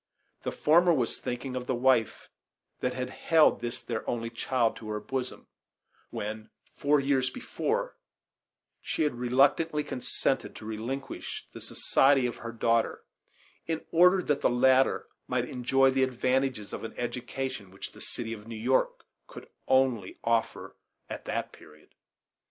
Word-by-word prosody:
The -, -, -3 dB
former 170 Hz, +3 st, +4 dB
was 130 Hz, -8 st, 0 dB
thinking 125 Hz, +1 st, -4 dB
of 125 Hz, -1 st, -4 dB
the 130 Hz, -, +1 dB
wife 125 Hz, -2 st, +2 dB, 0.5 s
that 125 Hz, -, -1 dB
had 125 Hz, 0 st, -3 dB
held 160 Hz, -6 st, +3 dB
this 120 Hz, +1 st, -3 dB
their 115 Hz, -2 st, -4 dB
only 115 Hz, -1 st, -2 dB
child 120 Hz, 0 st, 0 dB
to 110 Hz, -, -8 dB
her 105 Hz, 0 st, -2 dB
bosom, 130 Hz, +2 st, -4 dB, 0.6 s
when, 110 Hz, +1 st, -5 dB, 0.2 s
four 145 Hz, +1 st, +2 dB
years 135 Hz, -2 st, +1 dB
before, 485 Hz, -, -3 dB, 0.8 s
she -, -, -1 dB
had 150 Hz, -, +1 dB
reluctantly 140 Hz, +6 st, +2 dB
consented 130 Hz, -3 st, -1 dB
to -, -, -10 dB
relinquish 120 Hz, +5 st, -5 dB
the -, -, -9 dB
society 135 Hz, -1 st, +3 dB
of 120 Hz, -, -3 dB
her 115 Hz, -, -6 dB
daughter 115 Hz, 0 st, +1 dB, 0.6 s
in 160 Hz, -1 st, -2 dB
order 180 Hz, +2 st, +5 dB
that 145 Hz, -2 st, 0 dB
the -, -, +4 dB
latter 130 Hz, +2 st, +3 dB, 0.2 s
might -, -, 0 dB
enjoy 135 Hz, +2 st, +3 dB
the 135 Hz, 0 st, +1 dB
advantages 130 Hz, -3 st, 0 dB
of -, -, -5 dB
an 115 Hz, -, -6 dB
education 125 Hz, -2 st, -4 dB
which 95 Hz, +1 st, -8 dB
the -, -, -14 dB
city 115 Hz, -2 st, -3 dB
of 105 Hz, -1 st, -10 dB
New 115 Hz, -, -6 dB
York 125 Hz, +4 st, +1 dB, 0.2 s
could -, -, -11 dB, 0.2 s
only 130 Hz, -7 st, +2 dB
offer 115 Hz, -1 st, -1 dB, 0.4 s
at -, -, -6 dB
that -, -, -3 dB
period. 75 Hz, 0 st, -18 dB
125 Hz, 150 wpm, -29 LUFS, 115-135 Hz, 0.8 s, order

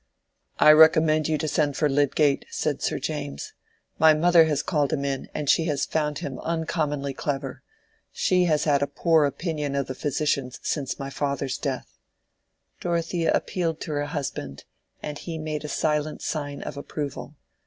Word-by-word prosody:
"I 150 Hz, -, +8 dB
recommend 155 Hz, 0 st, +6 dB
you 155 Hz, -1 st, +1 dB
to 155 Hz, +1 st, -2 dB
send 145 Hz, -1 st, 0 dB
for 150 Hz, -, +3 dB
Lydgate," 145 Hz, 0 st, +2 dB
said -, -, -2 dB
Sir -, -, 0 dB
James. 70 Hz, 0 st, -5 dB, 0.5 s
"My 160 Hz, -1 st, +7 dB
mother 170 Hz, +1 st, +5 dB
has 150 Hz, -2 st, 0 dB
called 150 Hz, -5 st, 0 dB
him 140 Hz, -3 st, -1 dB
in, 135 Hz, -1 st, -3 dB
and 150 Hz, -, -4 dB
she 165 Hz, -, +4 dB
has 150 Hz, -4 st, 0 dB
found 150 Hz, -2 st, -1 dB
him 135 Hz, -2 st, -5 dB
uncommonly 155 Hz, -4 st, -2 dB
clever. 135 Hz, -2 st, -4 dB, 0.5 s
She 180 Hz, -1 st, +2 dB
has 155 Hz, -3 st, +2 dB
had 145 Hz, -2 st, +2 dB
a 140 Hz, -, +1 dB
poor 160 Hz, +1 st, +3 dB
opinion 150 Hz, -1 st, -2 dB
of 140 Hz, -1 st, 0 dB
the 130 Hz, -, -5 dB
physicians 140 Hz, -2 st, -1 dB
since 140 Hz, -4 st, -2 dB
my 135 Hz, 0 st, -6 dB
father's 140 Hz, -2 st, -2 dB
death." 135 Hz, -3 st, -4 dB, 0.8 s
Dorothea 170 Hz, -1 st, 0 dB
appealed 165 Hz, -3 st, -1 dB
to -, -, -5 dB
her 145 Hz, -1 st, -1 dB
husband, 135 Hz, -, -5 dB, 0.4 s
and 150 Hz, -1 st, -5 dB
he 165 Hz, -2 st, -6 dB
made 155 Hz, -1 st, -4 dB
a -, -, -4 dB
silent 150 Hz, 0 st, -1 dB
sign 145 Hz, -2 st, -3 dB
of -, -, -6 dB
approval. 145 Hz, 0 st, -6 dB
150 Hz, 165 wpm, -25 LUFS, 140-160 Hz, 0.8 s, I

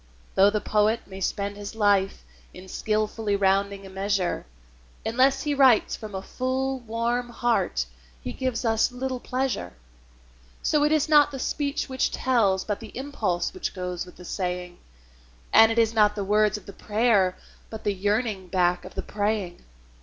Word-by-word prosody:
Though 195 Hz, +1 st, +6 dB
the 210 Hz, +1 st, 0 dB
poet 215 Hz, +2 st, +2 dB
may 190 Hz, 0 st, -10 dB
spend 200 Hz, +2 st, -2 dB
his 205 Hz, +1 st, -7 dB
life 200 Hz, -3 st, +2 dB, 0.3 s
in 185 Hz, +1 st, -11 dB
skilfully 215 Hz, +1 st, -1 dB
rounding 200 Hz, 0 st, +1 dB
a -, -, -9 dB
measure, 195 Hz, -, -1 dB, 0.6 s
Unless 260 Hz, +4 st, +3 dB
he 295 Hz, -1 st, 0 dB
writes 265 Hz, -5 st, +4 dB
from 215 Hz, -3 st, -8 dB
a 190 Hz, -, -4 dB
full, 260 Hz, +2 st, -2 dB
warm 235 Hz, +1 st, -2 dB
heart 230 Hz, -, 0 dB, 0.3 s
he -, -, -6 dB
gives 255 Hz, -2 st, -2 dB
us 225 Hz, +2 st, +2 dB
little 255 Hz, 0 st, -3 dB
pleasure. 255 Hz, -, -2 dB, 0.9 s
So 295 Hz, -1 st, +2 dB
it 300 Hz, -, +3 dB
is 310 Hz, -1 st, +2 dB
not 295 Hz, -2 st, +6 dB
the 275 Hz, -, -6 dB
speech 280 Hz, +2 st, -2 dB
which 260 Hz, -1 st, 0 dB
tells, 210 Hz, -7 st, +1 dB
but 205 Hz, -2 st, -2 dB
the 225 Hz, -1 st, -10 dB
impulse 220 Hz, -11 st, -2 dB
which 370 Hz, -, -4 dB
goes 180 Hz, -1 st, -4 dB
with 180 Hz, -, -14 dB
the 180 Hz, -, -12 dB
saying; 180 Hz, -1 st, -4 dB, 0.7 s
And 225 Hz, 0 st, +8 dB
it 225 Hz, -, -2 dB
is 225 Hz, -1 st, +3 dB
not 210 Hz, -2 st, +4 dB
the 205 Hz, -, -2 dB
words 210 Hz, 0 st, +3 dB
of 210 Hz, -, -13 dB
the 200 Hz, -, -10 dB
prayer, 210 Hz, -3 st, +2 dB, 0.3 s
but 220 Hz, -1 st, -8 dB
the 205 Hz, -, +1 dB
yearning 205 Hz, 0 st, -1 dB
back 180 Hz, -1 st, +1 dB
of 185 Hz, -, -11 dB
the -, -, -3 dB
praying. 205 Hz, -4 st, -2 dB
215 Hz, 170 wpm, -25 LUFS, 195-245 Hz, 0.9 s, And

